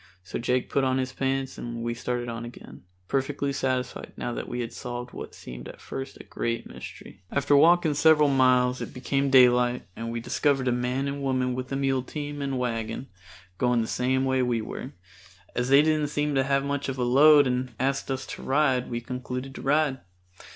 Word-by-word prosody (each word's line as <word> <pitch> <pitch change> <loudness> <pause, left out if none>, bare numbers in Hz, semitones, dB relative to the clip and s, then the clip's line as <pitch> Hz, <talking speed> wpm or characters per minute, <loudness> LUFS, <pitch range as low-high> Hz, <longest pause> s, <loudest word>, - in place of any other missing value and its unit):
So 95 - -5
Jake 125 +1 0
put 140 - +2
on 130 0 +2
his 130 -1 -2
pants 135 0 -2
and 115 -1 -5
we 120 0 -1
started 120 0 -3
on 115 0 -5
again, 120 -5 -11 0.2
perfectly 140 +2 -1
satisfied 130 -1 -2
now 120 - -3
that - - -5
we 120 - -3
had 115 0 -5
solved 125 0 -6
what - - -8
seemed 60 0 -9
at - - -11
first 135 0 -7
a - - -9
great 115 0 -3
mystery. - - -11
After 140 +1 +2
walking 165 +1 +5
several 150 0 +5
miles 130 -2 +3
it - - -6
became 135 +2 0
daylight 125 -1 +5
and 115 +1 -5
we 115 - -3
discovered 135 +2 +1
a - - +3
man 125 +3 -1
and 140 0 -4
woman 130 -2 0
with 130 +1 -5
a - - -1
mule 135 -1 +1
team 145 +2 -6
and 135 -1 -2
wagon, 115 +1 -3 0.5
going 125 -1 +2
the 110 - -2
same 130 +3 +1
way 130 0 +2
we 120 -2 +1
were. 120 +4 -6 0.6
As 125 +1 -1
they 140 +2 +7
didn't 155 -1 +2
seem 150 0 -1
to 135 -1 +2
have 140 0 +2
much 140 0 -2
of 135 - -3
a 125 - 0
load 145 +4 +7
and 125 -1 -2
asked 135 +2 0
us 135 0 -2
to - - -8
ride 135 -2 +1
we 120 -1 -3
concluded 125 +2 -5
to - - -8
ride. 145 -1 +2
130 Hz, 205 wpm, -26 LUFS, 125-140 Hz, 0.6 s, they